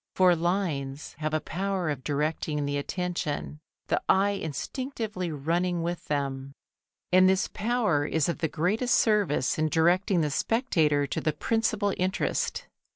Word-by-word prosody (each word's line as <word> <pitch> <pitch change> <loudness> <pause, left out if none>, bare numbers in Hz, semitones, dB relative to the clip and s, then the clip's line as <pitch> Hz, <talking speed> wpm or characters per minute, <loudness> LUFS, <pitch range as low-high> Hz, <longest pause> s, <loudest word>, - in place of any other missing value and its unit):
For 185 -2 +5
lines 160 -6 -2
have 155 0 -1
a 155 - +1
power 185 0 -2
of 135 -3 -5
directing 150 0 -1
the 145 0 -1
attention, 160 -2 -3 0.3
the - - 0
eye 200 +1 +4
instinctively 200 - -4
running 170 +4 -1
with 175 0 -3
them, 140 -2 -2 0.6
and 185 +1 +6
this 190 0 +2
power 210 -10 0
is 160 -3 +1
of 170 - -2
the 160 - +1
greatest 210 - +1
service 195 - +2
in 155 0 +2
directing 175 +3 +3
the 150 -2 0
spectator 155 - +1
to 140 - -3
the 155 - 0
principal 215 +3 0
interest. 185 +2 -1
170 Hz, 145 wpm, -27 LUFS, 150-195 Hz, 0.6 s, and